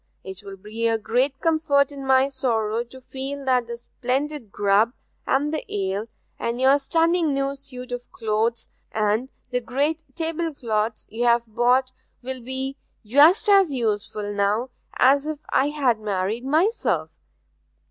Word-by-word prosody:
It 190 +1 -8
will 195 -1 -9
be 215 +4 -2
a 225 0 +2
great 255 +5 0
comfort 310 -4 +2
in 280 -1 -8
my 265 0 +5
sorrow 230 -4 -1
to 260 +2 -13
feel 270 +2 -6
that 250 -2 +2
the 235 0 -5
splendid 255 0 -3
grub, 205 +4 +3 0.3
and 290 +3 +1
the 310 - -2
ale, 200 +2 -2 0.3
and 235 +1 -2
your 270 +2 +5
stunning 325 +1 +2
new 275 0 -1
suit 255 -2 -10
of 245 0 -6
clothes, 225 +1 -1 0.2
and 215 +4 0 0.2
the 250 0 0
great 285 +7 -1
table 330 -1 -2
cloths 220 -3 -1
you've 235 +1 +2
bought, 245 +3 +2 0.3
will 260 0 -4
be 265 +3 -4 0.3
just 295 - +5
as 390 -5 +5
useful 210 -4 -2
now 205 +5 0 0.2
as 280 +3 +4
if 310 -1 -3
I 270 - +3
had 270 -7 +1
married 210 +3 -2
myself. 330 - +1
255 Hz, 145 wpm, -24 LUFS, 225-280 Hz, 0.3 s, my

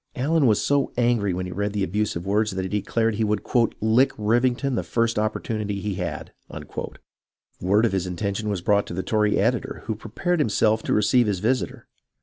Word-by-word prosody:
Allen 145 +2 +2
was 105 -3 +3
so 140 -1 +1
angry 120 -5 +2
when 90 +1 -3
he 90 - -6
read 100 +2 -2
the 100 -2 0
abusive 95 -2 -2
words 105 +2 +1
that 95 -1 -3
he - - -2
declared 110 +3 0
he 110 +2 -1
would 105 -1 -1 0.2
" - - -26
lick 110 +5 +3
Rivington 120 +5 +1
the - - 0
first 115 -2 0
opportunity 110 -1 -2
he 105 0 -3
had." 90 -4 -5 1.3
Word 100 +5 +3
of 115 - +1
his 95 -1 -1
intention 100 +4 -3
was 100 -4 -2
brought 100 +1 +2
to - - -6
the 95 - -2
Tory 105 -1 +1
editor, - - -1
who 110 - -1
prepared 115 - -2
himself 110 -3 +2
to - - -1
receive 115 +3 +3
his 100 -2 0
visitor. 120 +7 -1
105 Hz, 195 wpm, -24 LUFS, 100-115 Hz, 1.3 s, was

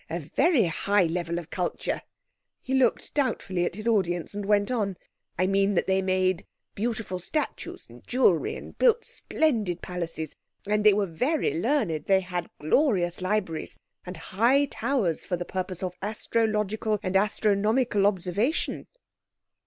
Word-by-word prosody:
A 165 +2 -2 0.2
very 290 - +4
high 200 +4 +2
level 170 0 -1
of 170 -1 -7
culture," 180 -2 -2 0.6
he 265 - -3
looked 265 -1 +2
doubtfully 190 -10 0
at 175 - -3
his 215 +2 -5
audience 175 -7 +1
and 205 -1 -4
went 205 +1 +3
on, 200 -6 -1 0.4
"I 185 - +2
mean 195 +1 +2
that - - +2
they 190 0 +2
made 185 -1 0 0.3
beautiful 220 -4 -3
statues 300 - -3
and 120 +1 -14
jewellery, 235 -10 +2
and - - -10
built 475 -1 +4
splendid 215 - -1
palaces. 165 -4 -5 0.3
And 210 0 +1
they 210 -1 +7
were 205 -1 +2
very 305 - 0
learned—they 195 - +2
had 180 -2 -4
glorious 180 - +2
libraries 185 -4 -2 0.3
and 180 -1 -7
high 235 +12 +2
towers 240 - -1
for 180 - -2
the 175 - -4
purpose 185 -1 -3
of 180 -1 -2
astrological 215 0 0
and 185 0 -2
astronomical 210 +2 +2
observation." 205 - -1
195 Hz, 145 wpm, -27 LUFS, 180-225 Hz, 0.6 s, they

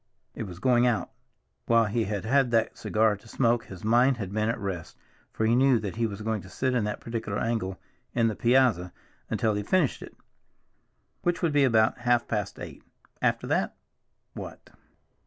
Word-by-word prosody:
It 110 - -5
was 90 -2 -9
going 120 +4 +3
out. 120 -3 0 0.6
While 115 -1 +4
he 110 +2 0
had 100 -2 -3
had 135 +2 +3
that 115 -1 +1
cigar 110 -1 +1
to 105 - -19
smoke 120 -1 +1
his 95 -3 -11
mind 120 +4 +4
had 100 -4 -5
been 110 +1 0
at 115 - -1
rest, 95 -6 -5 0.3
for 110 - -1
he 115 - +3
knew 130 0 +4
that 105 -2 -5
he 115 -1 +1
was 105 0 -7
going 110 -2 -1
to 95 - -13
sit 130 +7 -1
in 120 -4 +1
that 105 - -3
particular 115 -3 -4
angle 105 -6 -2 0.4
in 115 -2 +3
the 110 - -1
piazza 120 -8 +2 0.4
until 110 -2 +1
he 105 - -1
finished 155 - +1
it, - - -11 1.0
which 175 +1 -1
would 165 -3 +2
be 145 -1 +4
about 110 -1 +3
half 120 -1 +2
past 105 -3 -3
eight. - - -9 0.4
After - - +1
that—what? - - -6
115 Hz, 185 wpm, -27 LUFS, 105-120 Hz, 1.0 s, While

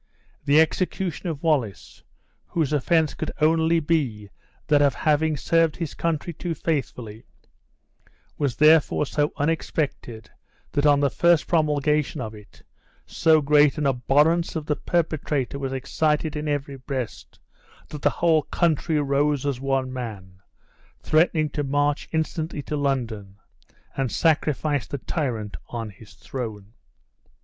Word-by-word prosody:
The 145 +1 +5
execution 175 +1 0
of 155 -2 -5
Wallace, 130 - -1 0.5
whose 155 -4 -1
offense 155 +2 +2
could - - -4
only 160 +1 +3
be 130 -11 -1 0.3
that 145 -2 +3
of 140 -1 +3
having 155 0 +1
served 165 +1 +2
his 165 -4 -4
country 165 +1 -2
too 170 +1 -4
faithfully, 125 -9 -3 1.1
was 140 -5 -1
therefore 155 -1 +4
so 145 +1 0
unexpected, 145 -7 -2 0.4
that 145 +1 +2
on 145 -1 +4
the 140 -2 +2
first 170 -1 +3
promulgation 150 -2 +1
of 110 -3 -5
it, 105 -1 -16 0.4
so 160 -2 +3
great 150 +1 +4
an 150 - -1
abhorrence 145 +7 +2
of 155 -2 -3
the 150 - 0
perpetrator 150 -6 -1
was 135 -1 -3
excited 150 +3 -1
in 150 0 -3
every 145 -1 -2
breast, 130 -2 -6 0.5
that 150 - -8
the - - +4
whole 165 -2 +2
country 160 0 0
rose 145 0 +1
as 135 -3 -2
one 135 -1 -1
man, 100 -7 -7 0.6
threatening 155 0 +3
to 145 - -2
march 145 +1 0
instantly 160 -1 -2
to 150 - -4
London, 115 -9 -2 0.6
and 135 -3 -1
sacrifice 150 -3 +1
the 140 - -4
tyrant 120 - -3
on 115 -3 -5
his 105 +1 -16
throne. 110 -5 -7
145 Hz, 135 wpm, -24 LUFS, 130-160 Hz, 1.1 s, The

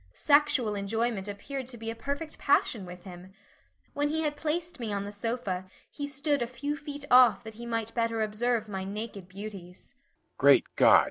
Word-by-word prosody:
Sexual 285 -7 +4
enjoyment 210 0 -1
appeared 250 +6 -5
to 245 -2 -7
be 225 0 -4
a - - -7
perfect 285 +6 -4
passion 225 -8 +2
with 180 0 -10
him. 185 0 -11 0.6
When 290 0 0
he 320 +1 0
had 295 -1 0
placed 320 +1 -3
me 225 -3 -3
on 200 0 -2
the 205 - -6
sofa 205 -3 -3 0.3
he 285 - -4
stood 285 0 0
a 240 - 0
few 285 +4 -3
feet 290 -1 -7
off 245 -2 +7
that 220 -1 -8
he 235 +2 -8
might 230 -1 -2
better 230 -1 0
observe 220 +1 0
my 190 -2 -4
naked 200 -1 -5
beauties. 195 0 -9
230 Hz, 175 wpm, -29 LUFS, 205-280 Hz, 0.6 s, off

